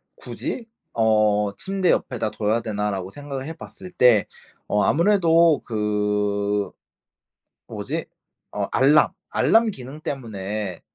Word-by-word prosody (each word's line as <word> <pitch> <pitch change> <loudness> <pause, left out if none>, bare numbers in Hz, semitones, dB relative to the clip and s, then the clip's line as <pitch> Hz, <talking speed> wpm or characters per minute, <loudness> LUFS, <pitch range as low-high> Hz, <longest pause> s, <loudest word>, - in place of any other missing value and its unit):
굳이 230 -2 -5 0.3
어 105 -2 +2
침대 190 -2 -1
옆에다 115 -4 -1
둬야 110 +2 0
되나.'라고 105 -4 -3
생각을 140 +3 -6
해 160 - -5
봤을 180 +2 -10
때 125 - +4 0.4
어 105 - +2
아무래도 170 -3 +4
그 105 -1 -1 1.0
뭐지? - - -4 0.5
어 - - -2
알람, 145 +3 +4 0.2
알람 225 0 +3
기능 135 0 -9
때문에 105 - -4
110 Hz, 215 characters per minute, -23 LUFS, 105-155 Hz, 1.0 s, 때